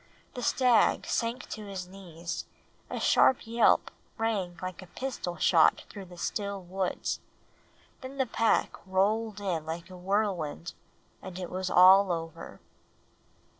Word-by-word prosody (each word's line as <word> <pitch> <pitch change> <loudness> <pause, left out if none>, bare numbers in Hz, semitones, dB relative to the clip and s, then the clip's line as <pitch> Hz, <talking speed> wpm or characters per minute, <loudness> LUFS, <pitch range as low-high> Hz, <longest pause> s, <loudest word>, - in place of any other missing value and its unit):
The 250 - -6
stag 245 -1 +3
sank 235 +1 -2
to 215 -1 -7
his 190 -2 -6
knees; 175 -3 -7 0.4
a - - -4
sharp 260 - +4
yelp 230 +1 +3 0.3
rang 205 -6 -1
like 185 -1 -6
a 185 - -12
pistol 180 -6 -5
shot 165 -3 +4
through 200 -2 -8
the 175 -1 -13
still 200 +2 -3
woods; 185 +1 -3 0.8
then 265 +1 -8
the 265 - +2
pack 225 -1 +1
rolled 210 +3 +1
in 180 -6 -2
like 165 +3 -6
a - - -9
whirlwind, 180 -4 -2 0.5
and 185 -1 -8
it 180 -2 -6
was 185 0 -3
all 190 +2 +7
over. 165 -1 -6
190 Hz, 135 wpm, -29 LUFS, 175-220 Hz, 0.8 s, all